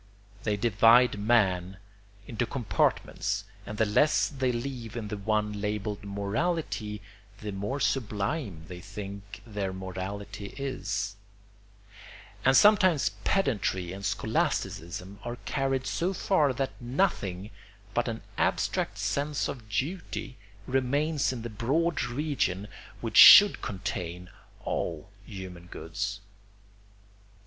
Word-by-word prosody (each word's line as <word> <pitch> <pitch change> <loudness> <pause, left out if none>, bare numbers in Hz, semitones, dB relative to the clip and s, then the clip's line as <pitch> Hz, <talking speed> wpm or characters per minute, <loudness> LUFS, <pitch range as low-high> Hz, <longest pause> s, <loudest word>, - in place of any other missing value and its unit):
They 105 -2 +1
divide 115 +2 +5
man 95 -4 +2 0.5
into 115 0 -2
compartments 105 -4 0 0.2
and 105 - -6
the 110 - +3
less 125 +9 +3
they 130 -3 0
leave 120 -2 -5
in 105 -3 -4
the 105 - -3
one 105 0 -1
labelled 105 0 -3
"morality" 105 - -2 0.4
the 105 -1 -5
more 100 +8 -3
sublime 105 - -1
they 90 0 -8
think 100 0 -8
their 105 -4 -3
morality 100 +2 -6
is; 105 -7 -3 1.3
and 135 +1 +5
sometimes 185 - +5
pedantry 100 - 0
and 100 +1 -8
scholasticism 100 -3 -2
are 120 0 -4
carried 135 -2 0
so 180 +3 -1
far 155 -7 +2
that 135 +1 -2
nothing 120 - -1 0.4
but 120 - +1
an 115 -1 -4 0.2
abstract - - 0
sense 145 0 -1
of 110 -5 -7
duty 140 - -3 0.3
remains 140 +4 +1
in 120 -3 -5
the - - -3
broad 145 - 0
region 120 -7 -1 0.3
which 115 -2 -2
should 205 -1 +10
contain 90 -3 -5 0.3
all 85 +2 -3 0.2
human 95 -4 -8
goods. 100 +4 -4
105 Hz, 110 wpm, -28 LUFS, 100-135 Hz, 1.3 s, should